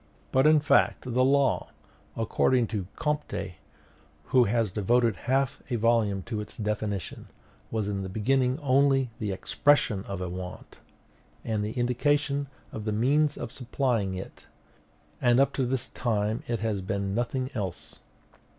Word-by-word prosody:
But 130 +3 +4
in 155 0 +6
fact, 145 - +3
the 125 0 +1
law, 140 +1 +2 0.5
according 120 +2 +2
to 110 - -2
M. 95 - -5
Ch. - - -32
Comte, 150 -9 -2 0.7
who 125 - +4
has 115 -1 +1
devoted 115 +2 +2
half 135 0 +1
a 125 - 0
volume 110 -4 +2
to 110 -3 -4
its 105 - -8
definition, 105 -2 -3 0.4
was 110 -3 -2
in 100 -1 -2
the 95 - -5
beginning 125 +6 +1
only 135 -2 +3
the 105 -3 -2
EXPRESSION 105 0 +2
OF 100 -2 -5
A 90 - -2
WANT, 90 +1 -8 0.7
and 110 -2 -1
the 105 +1 -3
indication 140 +3 +1 0.2
of 110 - -6
the 110 - 0
means 145 +7 +2
of - - -5
supplying 120 -6 -1
it; 95 - -9 0.7
and 120 0 +4
up 135 - +3
to 130 -3 0
this 130 0 -1
time 110 -2 -1
it 115 -2 -2
has 110 -3 -1
been 100 0 -2
nothing 130 +3 -1
else. 95 -7 -5
115 Hz, 155 wpm, -27 LUFS, 105-130 Hz, 0.7 s, in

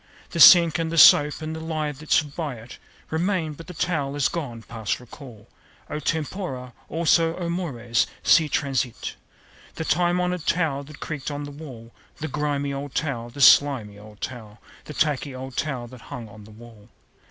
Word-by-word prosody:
The - - -4
sink 170 -3 +8
and 165 0 -2
the 165 - -3
soap 150 0 +7
and 155 +1 -4
the - - -6
lye 155 -2 -3
that 150 +2 -12
stood 150 -3 +2
by 155 -6 -3
it 115 +1 -12 0.3
Remain; 165 -1 -1
but 165 +3 -12
the 180 - -9
towel 155 -6 -1
is 145 -2 +1
gone 125 -9 -5
past 110 -1 -3
recall. 125 -3 -13 0.4
O 150 - -3
tempora! 150 -5 -3 0.2
Also, 165 +1 +2
O 175 -2 -3
mores! 125 -10 -1 0.2
Sic 160 -2 +5
transit 135 -4 -2 0.6
The 160 - -4
time 175 +2 +2
honored 180 -2 -2
towel 155 -5 0
that 150 0 -13
creaked 150 -3 -5
on 145 0 -5
the 145 - -7
wall. 130 -6 -11 0.3
The 155 - -4
grimy 145 -2 -2
old 140 0 -6
towel, 120 -6 -2
the 140 +4 -8
slimy 130 -8 +5
old 105 0 -15
towel, 110 -4 -7 0.3
The 150 - -9
tacky 145 -3 0
old 130 0 -8
towel 135 -5 -2
that 125 -1 -13
hung 115 -2 -8
on 105 0 -13
the - - -15
wall. 110 -1 -15
145 Hz, 185 wpm, -24 LUFS, 125-160 Hz, 0.6 s, sink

